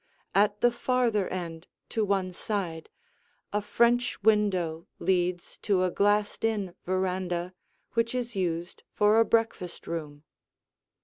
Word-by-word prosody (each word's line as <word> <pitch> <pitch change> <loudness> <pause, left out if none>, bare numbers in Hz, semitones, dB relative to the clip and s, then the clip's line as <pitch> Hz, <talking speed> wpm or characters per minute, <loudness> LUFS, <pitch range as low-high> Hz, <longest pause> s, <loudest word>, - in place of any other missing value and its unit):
At 205 +1 +3
the 240 - +5
farther 240 -4 +1
end, 170 -2 -5 0.2
to 220 - 0
one 195 -2 0
side, 175 -5 -3 0.6
a 210 - +1
French 235 +1 +2
window 185 -7 +2
leads 180 -1 0
to 190 -3 +2
a 185 - +1
glassed 205 +2 +1
in 210 -5 0
veranda 185 -1 -1 0.4
which 230 +1 +1
is 240 -2 -3
used 175 -2 -2
for 210 +1 +4
a 230 - +5
breakfast 225 -7 0
room. 150 -3 -5
195 Hz, 125 wpm, -28 LUFS, 175-220 Hz, 0.6 s, the